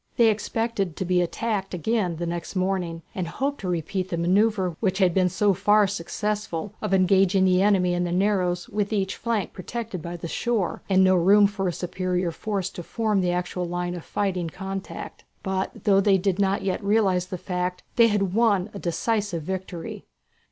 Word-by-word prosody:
They 230 -2 +6
expected 215 -4 -2
to 190 - -3
be 180 0 +2
attacked 195 +1 -2
again 180 -1 0
next 175 +2 -4
morning, 185 -3 -1
and 185 -4 -3
hoped 275 +11 -2
to 190 - -4
repeat 180 +2 -2
the 170 - -2
manoeuvre 190 +1 +2
which 190 -3 0
had 185 -3 +3
been 185 0 +3
so 205 +3 +2
far 205 +3 +4
successful, 200 0 -3
of - - -2
engaging 190 0 +4
the 185 0 +4
enemy 190 -3 +3
in 175 0 0
the 175 - -2
narrows 180 -2 +1
with 210 0 -2
each 195 -3 0
flank 225 -6 -2
protected 215 -1 -5
by 170 +2 -6
the 170 - -6
shore, 220 +1 -1
and 190 -1 +5
no 185 0 +5
room 200 +4 +6
for 200 -1 -1
a - - +1
superior 180 0 -2
force 195 0 -3
to 180 - -7
form 215 +2 0
in 185 - +1
the 175 - +2
actual 180 0 -2
line 175 0 -3
of 175 -2 -6
fighting 185 -4 -2
contact. 195 +3 -7 0.2
But 190 0 -3
though 195 -2 +4
they 195 -1 +4
did 190 0 0
not 195 0 +1
yet 195 +1 -1
realize 200 -3 +2
the 185 - -5
fact, 180 0 -3
they 235 -1 +6
had 195 -4 0
won 210 -3 +2
a 200 - -6
decisive 200 -1 -1
victory. 185 -1 -6
190 Hz, 190 wpm, -25 LUFS, 180-205 Hz, 0.2 s, They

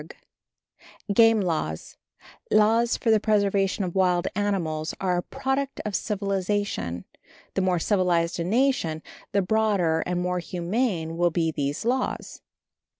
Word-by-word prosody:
_ - - -11 1.0
Game 225 0 +5
Laws 155 - -3 0.5
Laws 225 +3 +3
for 225 - +1
the 220 - +5
preservation 200 -2 +1
of 175 -2 -3
wild 180 -2 +2
animals 175 -6 -1
are 185 -2 0
a - - 0
product 270 +4 -3
of 210 -2 -2
civilization. 195 - -2 0.5
The - - 0
more 185 -1 +2
civilized 175 -2 +1
a - - 0
nation, 195 - +1 0.3
the 200 -1 +2
broader 195 -5 +2
and 180 0 -1
more 180 0 -1
humane 175 -1 -2
will 175 0 +3
be 165 -1 0
these 145 +4 -3
laws. 255 +2 -2
190 Hz, 135 wpm, -25 LUFS, 170-215 Hz, 1.0 s, Game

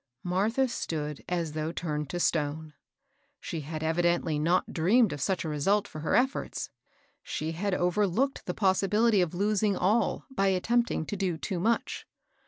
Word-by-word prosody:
Martha 210 +9 +1
stood 150 - -4
as 170 -3 -1
though 155 +1 -3
turned 150 -4 -3
to 175 - -3
stone. 155 -2 -1 0.7
She 165 - -5
had 155 +2 -5
evidently 165 -1 +1
not 170 +4 +1
dreamed 195 +4 +3
of 145 - -6
such 185 +3 0
a - - -2
result 195 +8 +1
for 155 - -8
her 155 - +1
efforts, 260 +2 0 0.2
— - - -38
she 155 +1 -3
had 185 +4 -1
overlooked 205 +9 0
the 180 - -2
possibility 205 +2 +3
of 175 -1 -1
losing 205 +1 +1
all 210 +3 +1
by 195 -6 +1
attempting 210 0 +1
to 205 - -4
do 185 -4 -1
too 180 +2 -3
much. 225 +6 -1
180 Hz, 165 wpm, -28 LUFS, 160-205 Hz, 0.7 s, dreamed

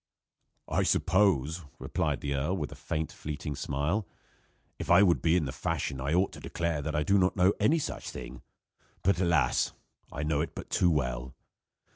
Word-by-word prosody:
"I - - +1
suppose," 90 -4 +2 0.2
replied - - -1
the 70 - -2
earl, 75 +8 0
with 75 -4 -3
a - - -8
faint, 80 0 -3
fleeting 75 -1 -5
smile, 75 +10 -1 0.7
"if - - -5
I 90 +4 +7
would 90 -4 +3
be 80 +1 +3
in 80 - 0
the 65 - -3
fashion 65 0 -2
I 70 +3 -1
ought 95 +2 +2
to - - -10
declare 85 -3 -2
that 75 +1 -3
I 75 - +2
do 100 +5 +3
not 90 0 +2
know 95 +1 +4
any 125 +11 +4
such 155 - -4
thing; 65 0 -8 0.6
but 95 0 +2
alas! 85 -3 +2 0.4
I 75 - -4
know 75 -1 +1
it 80 - -4
but - - -8
too 90 - +3
well. 65 -4 -1
80 Hz, 185 wpm, -29 LUFS, 70-90 Hz, 0.7 s, I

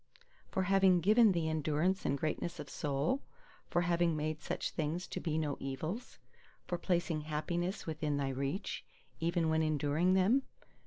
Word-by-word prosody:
For 190 - 0
having 190 -1 +5
given 215 +5 +6
thee 170 -3 0
endurance 160 +4 0
and 140 - +1
greatness 155 +3 -2
of 145 -2 -7
soul? 150 - 0 0.5
For 175 - +2
having 170 -1 +2
made 155 0 -2
such - - -3
things 165 +3 -2
to - - -5
be 160 -2 -1
no 150 -3 -1
evils? 155 - -4 0.5
For 175 - -2
placing 175 -4 0
happiness 170 +5 -2
within 155 -2 -1
thy 140 -1 0
reach, 135 - -3 0.4
even 170 0 +1
when 160 0 +2
enduring 155 +4 +2
them? 205 +9 +4
160 Hz, 155 wpm, -34 LUFS, 150-180 Hz, 0.5 s, given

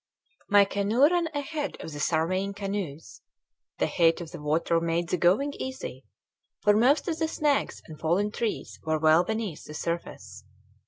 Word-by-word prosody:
My 205 0 +6
canoe 200 +6 +1
ran 340 +2 +4
ahead 295 -1 -4
of 160 - -7
the 145 - -7
surveying 185 +6 0
canoes. 195 -7 -5 0.6
The - - +1
height 165 -1 +3
of 170 -2 -8
the 170 -4 -8
water 165 +3 +1
made 170 +1 -1
the 180 - +1
going 200 - +2
easy, 260 - -6 0.6
for 210 -1 +5
most 255 +7 +3
of 325 -2 -2
the 320 - +1
snags 295 -3 0
and 155 -2 -11
fallen 180 +6 +1
trees 225 0 -3
were 160 0 0
well 155 +2 +5
beneath 220 -5 -4
the 150 - -9
surface. 170 +2 -5
195 Hz, 165 wpm, -27 LUFS, 165-260 Hz, 0.6 s, My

